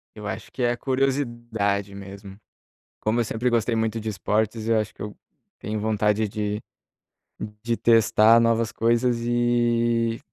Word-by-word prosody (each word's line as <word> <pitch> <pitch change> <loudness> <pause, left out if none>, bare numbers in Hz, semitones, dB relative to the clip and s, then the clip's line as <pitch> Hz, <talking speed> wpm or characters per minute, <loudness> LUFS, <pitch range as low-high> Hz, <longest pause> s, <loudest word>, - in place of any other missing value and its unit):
Eu 105 -1 -7
acho - - -6
que 130 - -4
é 120 0 +2
curiosidade 120 -7 -1
mesmo. 100 0 -10 0.6
Como 110 +2 0
eu 120 - +3
sempre 115 +3 -1
gostei 120 0 +1
muito 110 0 -1
de 110 0 -4
esportes, 110 +3 -1
eu 115 -1 +3
acho 105 -1 -4
que - - -15
eu 105 0 -6 0.4
tenho 105 +1 -4
vontade 105 0 +1
de 105 +1 -3 1.0
de 115 0 -1
testar 115 0 +5
novas 115 -1 +1
coisas 120 +1 +1
e, 120 -1 +1
115 Hz, 145 wpm, -24 LUFS, 105-120 Hz, 1.0 s, testar